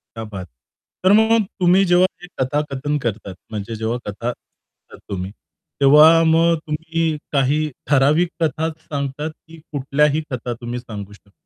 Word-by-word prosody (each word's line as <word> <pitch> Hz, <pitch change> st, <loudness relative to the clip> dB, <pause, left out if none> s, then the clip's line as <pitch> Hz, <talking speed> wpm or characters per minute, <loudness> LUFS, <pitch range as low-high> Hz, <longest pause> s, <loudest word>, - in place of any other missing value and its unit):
क्या 115 Hz, -, -5 dB
बात. 95 Hz, -2 st, -7 dB, 0.6 s
तर 185 Hz, -, +5 dB
मग 220 Hz, +1 st, +4 dB, 0.2 s
तुम्ही 180 Hz, +2 st, +4 dB
जेव्हा 175 Hz, +1 st, +4 dB, 0.2 s
हे 180 Hz, -, -10 dB
कथाकथन 145 Hz, +2 st, -1 dB
करतात, 105 Hz, -5 st, -4 dB, 0.2 s
म्हणजे 110 Hz, +1 st, -5 dB
जेव्हा 110 Hz, +2 st, -2 dB
कथा 110 Hz, +4 st, -3 dB
सांगता -, -, -20 dB
तुम्ही, 95 Hz, 0 st, -4 dB, 0.5 s
तेव्हा 155 Hz, +4 st, +7 dB
मग 165 Hz, +1 st, +4 dB
तुम्ही 160 Hz, 0 st, -1 dB
काही 145 Hz, +2 st, +1 dB, 0.2 s
ठराविक 150 Hz, +5 st, +3 dB
कथाच 160 Hz, +1 st, 0 dB
सांगतात, 145 Hz, 0 st, -4 dB, 0.2 s
की 165 Hz, 0 st, -13 dB
कुठल्याही 145 Hz, +2 st, +1 dB
कथा 125 Hz, -1 st, -3 dB
तुम्ही 120 Hz, +1 st, -4 dB
सांगू 105 Hz, -4 st, -9 dB
शकता? 100 Hz, -1 st, -21 dB
145 Hz, 140 wpm, -20 LUFS, 120-160 Hz, 0.6 s, तेव्हा